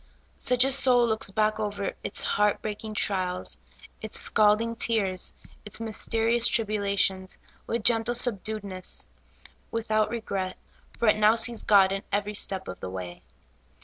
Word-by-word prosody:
Such 250 0 +3
a 270 - +1
soul 250 -3 +4
looks 220 -3 -1
back 215 +2 0
over 205 -2 -3
its - - -5
heart 210 -1 +1
breaking 215 0 -5
trials, 185 -3 -2 0.4
its 220 - -1
scalding 215 +2 +2
tears, 200 -5 0 0.3
its 210 - -3
mysterious 225 +1 +2
tribulations, 200 -3 0 0.3
with 230 -1 -2
gentle 235 +1 +4
subdued 220 -3 0
ness, 185 -2 -3 0.6
without 215 -1 0
regret, 195 -5 -4 0.4
for 235 - 0
it 215 - +4
now 215 +1 +5
sees 230 0 +2
God 195 -2 +5
in 195 0 -2
every 205 +1 -1
step 195 -2 -2
of 90 - -7
the - - -6
way. 90 -1 -7
215 Hz, 145 wpm, -26 LUFS, 195-225 Hz, 0.6 s, now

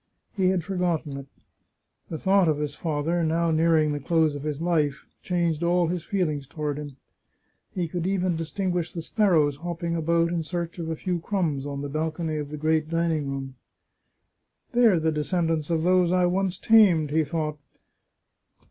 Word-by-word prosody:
He 190 -3 +2
had 185 -3 0
for 190 +4 -4
gotten 165 -5 -1
it. 140 0 -8 0.8
The 160 - -4
thought 190 +1 +3
of 155 -2 +2
his 150 -1 -3
father, 165 +2 -1
now 165 +1 +1
nearing 160 -1 +3
the 145 - -2
close 160 +1 +2
of 145 - -6
his 150 -1 -3
life, 155 -4 0 0.2
changed 170 -3 0
all 175 0 +2
his 175 -2 -2
feelings 155 - -1
toward 150 0 -3
him. 145 -2 -8 0.8
He 180 -3 -1
could 175 +1 -3
even 185 -2 0
distinguish 175 +1 -2
the 165 - -5
sparrows 160 -9 +2
hopping 170 +1 -3
about 170 +1 +1
in 170 -1 -1
search 170 +1 -4
of 165 -1 -4
a 160 - -2
few 180 +2 -2
crumbs 160 -7 -1
on 140 -1 -4
the - - -3
balcony 155 +2 -2
of 145 -1 -4
the 150 - -6
great 155 +1 +1
dining 165 -3 0
room. 135 -1 -5 0.6
" - - -50
They 240 0 +5
are 185 -6 +4
the 160 0 +1
descendants 160 0 -1
of 165 -1 0
those 180 -1 +3
I 180 0 +3
once 185 +1 0
tamed," 185 -10 +5
he 160 +1 +3
thought. 150 0 -3
165 Hz, 185 wpm, -25 LUFS, 150-175 Hz, 0.8 s, They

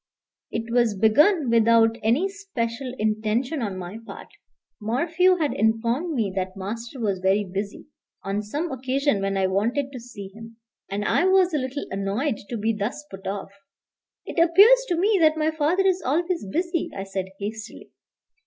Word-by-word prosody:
It 230 +1 -4
was 235 -4 +2
begun 280 - +4
without 230 0 +4
any 245 - +2
special 270 - -4
intention 220 +7 -1
on 200 -4 -3
my 185 +4 -7
part. - - -10 0.5
Morphew 330 - +2
had 310 -5 -1
informed 230 - 0
me 210 -6 -1
that 185 0 -3
master 230 +6 -6
was 200 -5 -1
very 190 +2 +2
busy, 200 +2 -5 0.4
on 200 +1 -2
some 295 +11 -4
occasion 265 -3 0
when 195 0 -1
I 190 - +2
wanted 230 +9 0
to 255 - -7
see 215 -5 -9
him. 225 +2 -12 0.3
And 205 +1 -3
I 355 - +2
was 375 -2 +4
a 300 - +2
little 260 +2 -4
annoyed 200 +7 -1
to 235 - -3
be 220 +2 0
thus 230 +8 -4
put 195 0 -9
off. 195 0 -4 0.7
"It - - -3
appears 425 +9 +6
to 355 - 0
me 400 +3 +3
that 315 -1 +4
my 310 0 +1
father 315 +5 +1
is 375 -1 +2
always 335 - -1
busy," 340 0 -1
I 195 - -3
said 195 -1 -4
hastily. 220 +2 -7
230 Hz, 170 wpm, -24 LUFS, 205-310 Hz, 0.7 s, appears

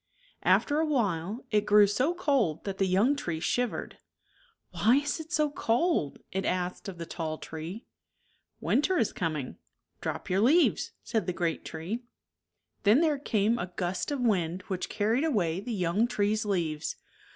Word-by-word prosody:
After 295 0 +3
a 320 - +2
while, 210 - -1
it 210 -1 +2
grew 210 0 +7
so 255 - +1
cold 275 - +1
that 195 -1 -5
the 195 - +3
young 205 +10 +3
tree 170 - -3
shivered. 245 +8 -2 0.4
" 470 -2 -35
Why 230 +4 +4
is 290 +3 0
it 320 +1 -9
so 305 -4 +2
cold? 240 - +1
" - - -47
it 190 +1 -1
asked 180 +2 -2
of 185 - -8
the 170 - -5
tall 160 -2 -4
tree. 165 +9 -7 0.4
" - - -41 0.3
Winter 355 +6 +2
is 225 - +1
coming. 155 -6 -3 0.4
Drop - - -4
your 185 +1 +1
leaves," 310 +10 +3
said 220 -5 -1
the 180 - 0
great 170 -2 -1
tree. 170 +9 -5 0.8
Then 220 +8 +5
there 305 -4 +2
came 225 -3 +1
a 180 +1 -4
gust 180 0 -2
of 285 -2 -2
wind 185 -6 +1
which 185 -2 -2
carried 225 +6 +1
away 190 - +1
the 235 +5 -5
young 195 +2 +1
tree's 215 -1 0
leaves. 165 -6 -1
210 Hz, 175 wpm, -29 LUFS, 175-260 Hz, 0.8 s, grew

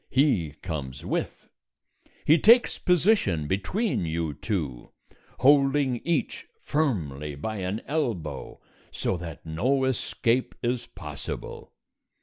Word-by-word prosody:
He 110 - +2
comes 70 -6 -5
with. - - -3 0.8
He 160 +2 +6
takes 235 +6 +6
position 180 - +3
between 185 - 0
you 80 -1 -2
two, 75 - -3 0.5
holding 135 -1 +4
each 170 0 -1
firmly 80 - -1
by 110 +10 -4
an 95 +3 -3
elbow 110 - -3 0.3
so - - -1
that 85 -2 -8
no 125 +13 +1
escape 130 -1 0
is 120 0 -1
possible. - - -7
110 Hz, 105 wpm, -26 LUFS, -, 0.8 s, He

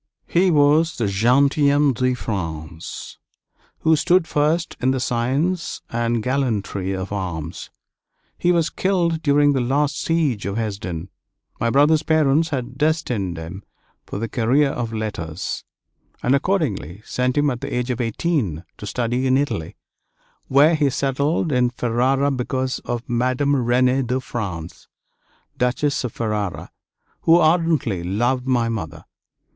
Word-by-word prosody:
He 185 +2 +2
was 155 +1 +3
the 115 - 0
gentilhomme 140 +7 +3
de 130 +1 0
France 80 -8 -6 0.6
who 160 0 +4
stood 175 +2 +3
first 155 +4 0
in 130 - +2
the 130 0 +1
science 135 +9 -1
and 115 -1 0
gallantry 110 -7 -1
of 95 +1 -5
arms. 85 -5 -5 0.7
He 175 - +2
was 170 -2 +1
killed 170 -4 0
during 145 -1 +4
the 135 - +1
last 145 +3 0
siege 150 -11 0
of 100 +2 -3
Hesdin. 95 -6 -4 0.5
My 115 - +1
brother's 150 +5 +4
parents 155 0 +2
had 130 -3 -4
destined 125 - 0
him 85 +4 -7 0.5
for - - -5
the 115 +3 -2
career 130 +6 +2
of 120 -2 -3
letters, 100 -7 -4 0.6
and 125 - +3
accordingly 135 - -1
sent 125 +2 -1
him 145 -1 +3
at 120 - -5
the - - -5
age 125 +1 -1
of 125 0 -2
eighteen 115 - -1
to 105 - -8
study 125 +3 -1
in 130 0 +4
Italy, 140 - -2 0.7
where 145 +5 +5
he 150 -3 +2
settled 140 +4 0
in 125 -2 +3
Ferrara 130 +4 +1
because 130 0 -2
of 120 0 -4
Madame 130 +4 +1
Renée 125 0 +2
de 125 +2 0
France, 95 -10 -6 0.7
Duchess 130 +4 0
of 125 - -3
Ferrara, 105 -5 -3 0.5
who 165 +1 +5
ardently 160 - +2
loved 120 +8 0
my 120 -3 +2
mother. 85 -8 -5
125 Hz, 140 wpm, -21 LUFS, 110-145 Hz, 0.7 s, where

